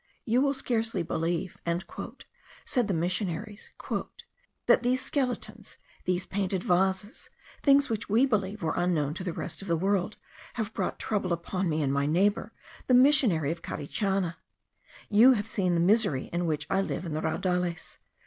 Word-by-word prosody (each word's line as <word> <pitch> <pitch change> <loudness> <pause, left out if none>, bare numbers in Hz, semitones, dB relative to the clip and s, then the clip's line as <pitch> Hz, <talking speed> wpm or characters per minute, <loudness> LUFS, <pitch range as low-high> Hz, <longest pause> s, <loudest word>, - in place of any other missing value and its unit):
"You 245 +1 +2
will 280 0 +2
scarcely 225 -7 -1
believe," 165 +2 -2 1.1
said 245 -5 +1
the 200 - 0
missionaries, 185 +4 -3 1.0
"that - - +5
these 255 +1 +1
skeletons, 245 -6 -3 0.3
these 180 0 0
painted 195 -2 -2
vases, 190 +5 0 0.3
things 280 0 +5
which 220 -2 -3
we 230 +6 +4
believed 210 -5 -1
were 160 - 0
unknown 155 -5 +1
to 180 - -6
the 180 - -2
rest - - -6
of 195 - -9
the 170 -1 +1
world, 195 +3 0 0.4
have 220 -2 -3
brought - - -2
trouble 200 -4 -2
upon 175 +2 -1
me 155 -1 0
and 135 -1 0
my 140 0 +1
neighbour, 200 +7 +1 0.4
the 255 - +5
missionary 245 - +4
of 170 - -5
Carichana. 190 +3 -2 0.7
You 230 +5 +7
have 210 -3 -2
seen 185 -5 0
the - - +2
misery 185 - +2
in 175 0 0
which 150 -2 -1
I 190 - +1
live 195 - -3
in 165 - -4
the 155 - -2
raudales. 180 +1 -2
190 Hz, 160 wpm, -28 LUFS, 170-220 Hz, 1.1 s, You